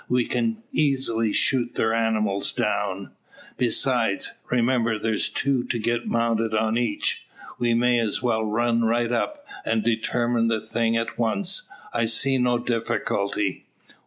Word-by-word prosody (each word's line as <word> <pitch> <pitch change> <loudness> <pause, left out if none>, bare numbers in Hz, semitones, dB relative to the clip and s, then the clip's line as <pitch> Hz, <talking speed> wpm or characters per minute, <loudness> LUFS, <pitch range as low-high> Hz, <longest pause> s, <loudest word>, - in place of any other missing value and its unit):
We 125 -1 +2
can 230 -1 -1
easily 130 -7 +1
shoot 120 +2 +1
their 110 0 +1
animals 110 -3 0
down. 100 -2 -2 0.5
Besides, 120 -3 +1 0.2
remember 120 -2 +2
there's 110 0 0
two 135 -3 0
to 120 - -2
get 120 +1 -1
mounted 115 -1 +1
on 110 0 +1
each. 120 -3 -1 0.3
We 120 -1 +2
may 120 +1 +3
as 110 -3 -1
well 115 -3 0
run 115 +2 +1
right 120 +1 +1
up, 290 - -2 0.2
and 110 -1 0
determine 120 +1 +1
the 115 -1 +1
thing 115 +1 0
at 115 +1 -3
once. 185 - 0 0.2
I 115 -1 +1
see 130 +4 +1
no 125 -1 +2
difficulty." 105 -4 -2
115 Hz, 140 wpm, -24 LUFS, 110-120 Hz, 0.5 s, may